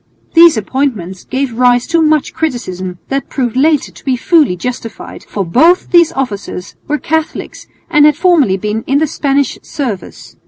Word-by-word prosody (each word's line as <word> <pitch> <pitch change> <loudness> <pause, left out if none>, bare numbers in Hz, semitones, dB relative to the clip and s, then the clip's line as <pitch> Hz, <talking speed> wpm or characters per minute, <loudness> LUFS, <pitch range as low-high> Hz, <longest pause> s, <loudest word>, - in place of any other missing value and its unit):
These 335 -5 +7
appointments 210 -6 -2
gave 265 -2 -2
rise 245 0 +3
to 335 -1 +1
much 310 -2 +1
criticism 185 - -4
that 275 0 -2
proved 250 -4 -2
later 295 +2 +2
to - - -17
be 265 -2 0
fully 305 - +3
justified, 230 +2 -7
for 200 -2 -3
both 320 - +3
these 340 -2 +5
officers 205 -7 -5
were 300 - 0
Catholics 320 +1 -3 0.2
and 300 -3 +5
had 300 - +3
formerly 330 - +3
been 210 +3 -3
in 275 - +2
the 315 - +2
Spanish 280 -2 -1
service. 240 -10 -6
270 Hz, 160 wpm, -14 LUFS, 215-310 Hz, 0.2 s, These